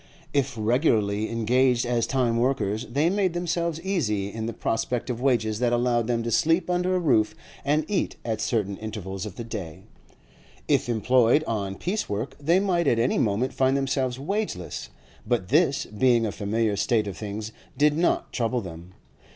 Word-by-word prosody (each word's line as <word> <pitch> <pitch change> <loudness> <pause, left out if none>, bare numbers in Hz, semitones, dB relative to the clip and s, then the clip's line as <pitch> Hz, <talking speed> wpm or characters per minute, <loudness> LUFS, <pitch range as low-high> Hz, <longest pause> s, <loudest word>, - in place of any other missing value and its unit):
If 140 -3 0
regularly 110 -3 +1
engaged 125 +2 +2
as 120 -1 0
time 125 -4 +1
workers, 120 -3 0
they 140 +7 +1
made 195 -3 +1
themselves 170 -2 -1
easy 105 - -1
in 110 0 -4
the - - -2
prospect 120 +4 -2
of 120 0 -5
wages 110 -5 +1
that 120 -1 +1
allowed 120 -1 +1
them 120 -1 0
to 115 - -2
sleep 165 - +2
under 180 +1 +1
a - - +2
roof 125 -11 +2 0.3
and 150 +2 +1
eat 205 - -1
at 110 -2 -2
certain 100 -4 -1
intervals 105 -2 -5
of 100 - -9
the 115 - -6
day; 100 -9 -7 0.8
if - - +2
employed 120 +4 +3
on 100 -7 -3
piece 190 - -2
work 105 +6 -3
they 165 +6 +3
might 175 -5 +1
at 120 - +3
any 115 +2 +2
moment 110 +5 0
find 130 +1 +2
themselves 135 -2 -1
wageless, 145 - -3 0.4
but 115 -6 0
this, 145 0 +3
being 115 +2 +2
a 105 - -1
familiar 105 +1 -1
state 110 +1 +1
of 100 - -5
things, 105 +1 -5 0.3
did 150 +1 +4
not 170 +2 0
trouble 120 0 0
them. 85 -1 -10
120 Hz, 175 wpm, -25 LUFS, 110-140 Hz, 0.8 s, did